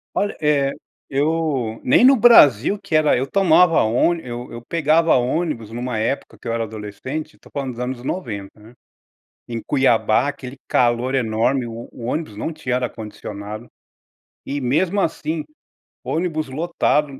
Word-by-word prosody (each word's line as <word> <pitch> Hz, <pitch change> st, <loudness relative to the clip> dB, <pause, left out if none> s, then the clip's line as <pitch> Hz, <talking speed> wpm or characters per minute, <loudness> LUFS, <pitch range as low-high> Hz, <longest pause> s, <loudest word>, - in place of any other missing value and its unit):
Olha, 205 Hz, -, -1 dB
eh, 145 Hz, -2 st, +2 dB, 0.4 s
eu 140 Hz, -5 st, -1 dB
nem 130 Hz, -, +5 dB
no 270 Hz, +1 st, +8 dB
Brasil 205 Hz, -, +6 dB
que 170 Hz, -, -9 dB
era 155 Hz, -3 st, +4 dB
eu 130 Hz, -, 0 dB
tomava 180 Hz, 0 st, +4 dB
ôni 145 Hz, +10 st, +2 dB
eu 120 Hz, 0 st, -7 dB
eu 120 Hz, -, -8 dB
pegava 165 Hz, +3 st, +2 dB
ônibus 125 Hz, -3 st, -1 dB
numa 120 Hz, 0 st, -3 dB
época 115 Hz, +6 st, -2 dB
que -, -, -10 dB
eu 115 Hz, -, -1 dB
era 115 Hz, 0 st, -1 dB
adolescente, 110 Hz, +8 st, -6 dB
tô -, -, -18 dB
falando 135 Hz, -2 st, -3 dB
dos 120 Hz, -, -10 dB
anos 125 Hz, 0 st, -4 dB
90, 110 Hz, -, -5 dB
né. 110 Hz, +3 st, -16 dB, 0.7 s
Em 115 Hz, -2 st, -4 dB
Cuiabá 120 Hz, -4 st, +2 dB
aquele 140 Hz, -2 st, -6 dB
calor 120 Hz, +2 st, +1 dB
enorme 120 Hz, +1 st, +1 dB
o 115 Hz, 0 st, -7 dB
o 120 Hz, -, -11 dB
ônibus 125 Hz, -1 st, -3 dB
não 110 Hz, -, -3 dB
tinha 140 Hz, -6 st, -3 dB
ar 125 Hz, -1 st, -2 dB
condicionado. 105 Hz, 0 st, -8 dB, 0.8 s
E 145 Hz, +1 st, -3 dB
mesmo 165 Hz, +10 st, +1 dB
assim, 160 Hz, -2 st, -2 dB, 0.6 s
ônibus 155 Hz, -2 st, -2 dB
lotado, 150 Hz, -2 st, 0 dB
130 Hz, 155 wpm, -21 LUFS, 115-155 Hz, 0.8 s, no